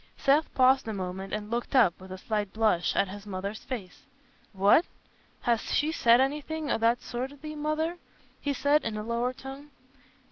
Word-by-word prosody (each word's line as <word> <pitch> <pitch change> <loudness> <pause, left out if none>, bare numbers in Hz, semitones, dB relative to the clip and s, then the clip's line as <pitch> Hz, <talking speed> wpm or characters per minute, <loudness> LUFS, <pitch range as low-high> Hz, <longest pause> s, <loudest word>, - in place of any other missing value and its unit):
Seth 290 +3 +3
paused 260 -1 +4
a 220 - -2
moment 190 0 -5
and 210 +1 -4
looked 240 +3 -2
up, 195 -9 +4
with 190 0 -11
a 185 - -5
slight 205 0 -2
blush, 215 -6 +1
at 200 - +2
his 205 +2 -9
mother's 200 +2 -4
face. 210 -9 -7 0.5
"What! 200 - +5 0.6
Has 235 -2 +1
she 300 +2 +2
said 235 -6 +5
anything 295 +3 -1
o' - - +1
that 230 +2 +2
sort 250 +2 -4
to 285 - -13
thee, 305 +2 -7
Mother?" 310 +3 -1 0.4
he 285 - -1
said, 285 +2 +2
in 220 -2 -3
a 210 - -4
lower 235 +2 -1
tone. 270 +3 -10
235 Hz, 185 wpm, -28 LUFS, 205-285 Hz, 0.6 s, What